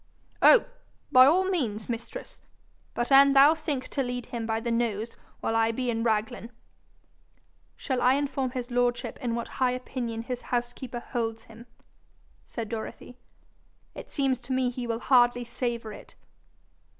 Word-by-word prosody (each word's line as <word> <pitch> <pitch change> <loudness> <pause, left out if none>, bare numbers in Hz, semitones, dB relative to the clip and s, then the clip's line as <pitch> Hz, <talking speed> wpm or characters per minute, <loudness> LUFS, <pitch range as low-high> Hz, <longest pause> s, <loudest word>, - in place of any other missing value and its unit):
'Oh, - - +7 0.5
by 255 +1 +8
all 355 +6 +4
means, 235 - -2
mistress! 235 0 -7 0.5
but 240 +3 -2
an' 275 0 +7
thou 280 +3 +7
think 295 -5 -4
to 275 - -1
lead 245 -2 -3
him 230 -2 -5
by 225 0 0
the 235 +1 -3
nose 230 -1 -1 0.3
while 225 - -1
I 225 0 +3
be 245 +1 -2
in 225 0 -2
Raglan, 225 0 -1 0.6
' - - -39
'Shall 260 -2 -2
I 255 +2 +4
inform 275 -2 -1
his 250 -1 -5
lordship 245 0 0
in 235 -2 -1
what 235 - -3
high 250 -1 +3
opinion 240 -3 -4
his 245 +1 -5
housekeeper 245 0 -4
holds 225 -3 -3
him?' 230 +2 -14 0.8
said 230 -3 -5
Dorothy. 230 +2 -7 0.7
'It - - -10
seems 270 -3 0
to 255 +2 -5
me 255 -1 +1
he 245 -1 -5
will 230 0 -2
hardly 245 -2 +4
savour 235 -3 -4
it.' - - -13
245 Hz, 160 wpm, -27 LUFS, 230-260 Hz, 0.8 s, by